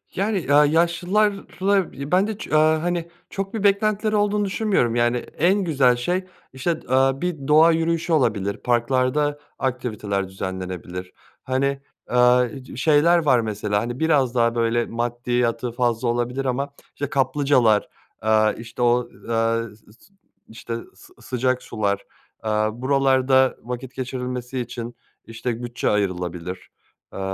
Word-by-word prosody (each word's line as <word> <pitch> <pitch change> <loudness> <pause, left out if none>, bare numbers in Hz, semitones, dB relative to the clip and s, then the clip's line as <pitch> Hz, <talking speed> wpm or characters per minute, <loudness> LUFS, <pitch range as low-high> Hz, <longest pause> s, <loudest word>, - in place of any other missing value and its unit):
Yani, 200 +2 0
eee, 145 -5 -1 0.2
yaşlılarla 190 +3 +1 0.2
ben 190 +3 +3
de 220 -2 -4
ço 155 - -3
aaa, 155 +1 +3
hani, 175 -1 -1 0.2
çok 195 -1 -4
bir 220 -3 -3
beklentileri 210 +1 +2
olduğunu 205 0 +1
düşünmüyorum, 190 - +1
yani, 120 +1 +2
en 185 +10 0
güzel 135 -7 +3
şey, 180 +10 -1 0.3
işte, 130 +6 -1 0.2
eee, 135 +1 +4
bir 155 -6 -3
doğa 160 +2 +6
yürüyüşü 165 +1 0
olabilir, 105 -9 +1
parklarda 130 +4 +1 0.2
aktiviteler 110 -7 -2
düzenlenebilir. 95 -1 -6 0.3
Hani, 135 +1 -1 0.3
eee, 125 +1 +2
şeyler 155 +5 +4
var 130 -4 +5
mesela, 105 -2 -1
hani, 120 +3 -5
biraz 140 -6 +2
daha 115 0 +2
böyle 115 0 +1
maddiyatı 120 0 -1
fazla 120 0 0
olabilir 120 +3 -1
ama, 135 +2 -1 0.3
işte, 145 -1 -3
kaplıcalar, 130 -5 +2 0.3
eee, 110 -1 +3
işte, 115 +1 -8
o, 120 0 +2 0.2
eee, 115 -1 0
s 105 -1 -22
s 195 - -24 0.4
işte, 115 +1 -6 0.2
sı - - -18
sıcak 130 0 -1
sular, 100 -2 -2 0.4
eee, - - 0 0.2
buralarda 130 0 +3
vakit 125 +2 -6
geçirilmesi 125 0 -4
için, 120 0 -6 0.3
işte, 115 +1 -4
bütçe 120 0 -2
ayrılabilir. 90 -3 -2 0.4
Eee, - - -6
125 Hz, 130 wpm, -23 LUFS, 115-155 Hz, 0.4 s, doğa